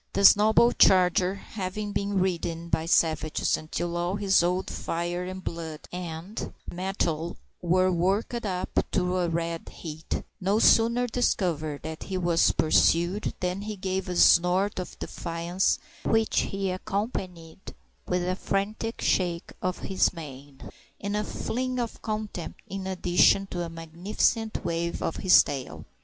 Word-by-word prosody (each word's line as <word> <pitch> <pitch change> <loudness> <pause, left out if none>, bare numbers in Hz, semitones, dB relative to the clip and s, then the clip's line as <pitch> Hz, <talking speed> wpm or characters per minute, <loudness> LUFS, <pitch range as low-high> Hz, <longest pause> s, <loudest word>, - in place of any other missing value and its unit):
This 200 0 +8
noble 220 +3 +4
charger, 185 0 +4
having 200 +1 -5
been 200 -1 -1
ridden 170 -2 -2
by 160 0 0
savages 160 -2 +2
until 170 +2 -4
all 175 +2 -1
his 200 -3 +3
old 180 +2 0
fire 175 +2 -3
and 185 0 -7
blood 160 -2 -5
and 180 +3 -6 0.2
mettle 175 -3 -2 0.2
were 185 +2 +3
worked 195 +7 0
up 185 -3 -1
to 180 +1 +1
a 175 -1 +1
red 165 0 -3
heat, 160 -1 -6 0.2
no 195 +3 +1
sooner 230 +2 +4
discovered 170 -11 -1
that 160 0 -6
he 190 - -3
was 175 -2 +3
pursued 175 +5 +2
than 180 +2 -1
he 210 +1 -5
gave 190 0 -3
a 180 - -2
snort 180 +4 +4
of 180 - -6
defiance, 170 +2 -1 0.3
which 225 0 +2
he 195 -1 -2
accompanied 185 -4 -4 0.5
with 180 0 0
a 185 - 0
frantic 210 +4 -2
shake 175 -2 0
of 185 0 -1
his 190 -1 +2
mane 140 -4 -10 0.3
and 200 +1 -3
a 210 - 0
fling 255 +4 -3
of 235 -2 -4
contempt 215 -6 -5
in 195 0 -5
addition 185 +1 +3
to 180 -2 -5
a 170 - -3
magnificent 180 +7 -1
wave 170 0 -2
of - - -2
his 185 -1 +6
tail. 135 -3 -6
180 Hz, 145 wpm, -27 LUFS, 170-200 Hz, 0.5 s, This